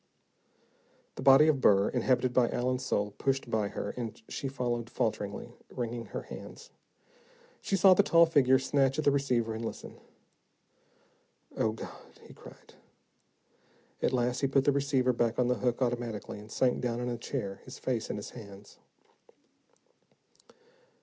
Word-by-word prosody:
The - - -8
body 135 +3 +7
of 145 -4 +2
Burr, 100 -2 +4
inhabited 125 0 +1
by 120 -2 +3
Allen's 125 +1 -1
soul, 105 -5 -1
pushed 135 -3 -1
by 110 -2 +1
her, 100 0 -4
and 115 -3 -6
she 140 - -4
followed 120 -3 -3
falteringly, 110 -5 -3 0.2
wringing 120 -1 -4
her - - -6
hands. - - -11 0.9
She - - -1
saw 190 0 +7
the 185 - +5
tall 170 -4 +5
figure 135 -5 +4
snatch 135 0 +1
at 155 - -1
the 145 - +5
receiver 125 -5 0
and 110 +1 -5
listen. 115 - -7 1.6
"Oh, 110 - 0
God," 110 - -11
he - - -14
cried. - - -15 1.3
At - - +1
last, 125 0 0
he 135 - +1
put 135 0 +2
the 145 - +3
receiver 135 -2 +1
back 115 -1 0
on 125 -1 +2
the 125 - 0
hook, 125 +1 0
automatically, 120 -4 -3
and 105 +1 -13
sank 125 +1 +1
down 120 -2 -2
in 125 - -3
a 120 - -2
chair, 100 -4 -5
his 130 - -10
face 125 -4 -2
in - - -3
his 105 - -7
hands. 100 -3 -12
125 Hz, 155 wpm, -30 LUFS, 115-135 Hz, 1.6 s, body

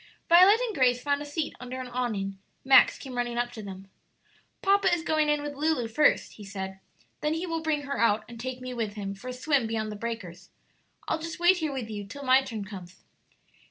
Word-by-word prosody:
Violet 370 +6 +8
and 480 -3 -1
Grace 250 -5 +3
found 285 +2 0
a - - -5
seat 290 +1 -3
under 250 +1 -6
an 255 - -4
awning. 215 -6 -3 0.3
Max 265 0 +6
came 265 -2 -9
running 240 -1 -1
up 240 0 0
to 225 - -8
them. 195 -1 -9 0.8
"Papa 395 -1 +4
is 345 -2 +1
going 310 -2 +1
in 295 0 +1
with 295 0 -4
Lulu 285 -4 0
first," 290 +7 +2
he 210 - -11
said; 190 -1 -6 0.4
"then 300 +1 0
he 330 +3 -2
will 330 -2 -2
bring 310 -2 0
her 280 0 -4
out 215 -2 +3
and 235 0 -11
take 255 +1 -5
me 255 0 -5
with 220 -3 -3
him 195 -2 -4
for 200 +6 -11
a - - -3
swim 260 -1 +1
beyond 220 -1 -2
the - - -6
breakers. 205 -6 -6 0.6
I'll - - 0
just 330 +1 -6
wait 350 +2 +5
here 315 -4 -2
with 260 -5 -4
you 210 -2 -5
till 280 +7 -8
my 260 0 +5
turn 225 -6 -6
comes." 185 -3 -11
255 Hz, 225 wpm, -28 LUFS, 220-300 Hz, 0.8 s, Violet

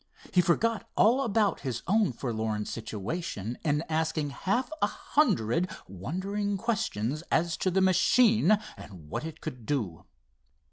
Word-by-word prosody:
He 180 - +6
forgot 220 +6 +1
all 240 +5 +5
about 220 -4 +1
his 125 -4 -4
own 210 -1 +3
forlorn 110 -4 -2
situation 110 - -4
in 150 0 +1
asking 160 -2 -1
half 240 - -1
a - - +4
hundred 180 - +1 0.2
wondering 195 - -3
questions 155 - -1
as 165 +1 +1
to 185 - +1
the 190 +1 +2
machine 210 +2 +5 0.2
and 85 -7 -12
what - - -2
it 160 -1 -7
could 125 -8 -7
do. 110 - -2
165 Hz, 135 wpm, -29 LUFS, -, 0.2 s, He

